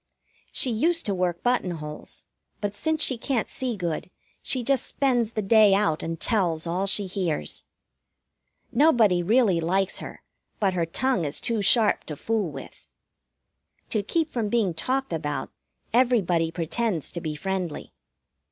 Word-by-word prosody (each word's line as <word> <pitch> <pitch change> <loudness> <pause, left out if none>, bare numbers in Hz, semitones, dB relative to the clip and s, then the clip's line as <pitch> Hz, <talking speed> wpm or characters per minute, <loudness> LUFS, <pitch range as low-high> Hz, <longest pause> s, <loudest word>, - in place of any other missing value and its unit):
She 255 - +2
used 330 +9 +1
to 205 - 0
work 180 -2 -1
buttonholes, 175 -11 -3 0.3
but 205 -1 -2
since 315 +7 0
she 255 -4 0
can't 245 -2 -1
see 250 -4 -3
good 175 -2 -3 0.3
she 255 -2 -1
just 270 +1 +2
spends 245 -5 +1
the 215 - -2
day 210 -1 +6
out 195 -6 +1
and 165 0 -4
tells 175 -8 +1
all 180 +4 -1
she 200 +1 +1
hears. 180 - -3 1.1
Nobody 230 - +4
really 200 -2 +3
likes 190 +3 0
her, - - -9 0.4
but 195 -3 +2
her 170 -2 0
tongue 255 +2 0
is 145 -1 -1
too 230 -3 -1
sharp 215 +1 +4
to 150 - -6
fool 215 +2 -1
with. - - -11 1.0
To 215 - 0
keep 315 - -1
from 225 -4 -1
being 210 -6 +1
talked 260 +7 -1
about, 145 -4 -3 0.4
everybody 205 -10 +3
pretends 175 - -2
to 170 - -5
be 155 -2 -4
friendly. 185 0 -4
200 Hz, 150 wpm, -25 LUFS, 170-240 Hz, 1.1 s, day